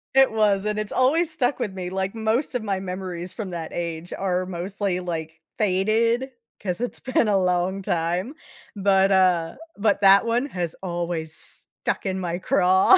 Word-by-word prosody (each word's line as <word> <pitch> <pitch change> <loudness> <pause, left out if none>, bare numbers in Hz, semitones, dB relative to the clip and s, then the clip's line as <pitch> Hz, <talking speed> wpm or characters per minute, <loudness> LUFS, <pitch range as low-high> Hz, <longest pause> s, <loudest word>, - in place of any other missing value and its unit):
It 270 -2 +6
was 210 -2 +2
and 210 0 -1
it's 215 -1 -4
always 310 +6 +3
stuck 275 -4 0
with 195 - -2
me, 180 -1 -4
like 190 +2 -2
most 225 +5 0
of 240 - -1
my 195 -3 -1
memories 180 -2 -5
from 210 -5 -5
that 170 -2 -5
age 170 0 -4
are 185 -1 0
mostly 185 +1 -2
like 160 -2 -5 0.2
faded, 220 +6 +2 0.3
'cause 180 -3 -2
it's 245 +1 -3
been 255 -4 +2
a 205 - +3
long 185 +1 +1
time. 175 - -1 0.4
But, 195 0 +4
uh 180 -3 +3 0.2
but 205 -1 +2
that 195 +1 +7
one 235 +3 +1
has 175 - -3
always 170 -3 -3
stuck - - -4
in 190 -1 -1
my 175 -1 -2
craw, 190 - +5
190 Hz, 170 wpm, -24 LUFS, 180-215 Hz, 0.4 s, that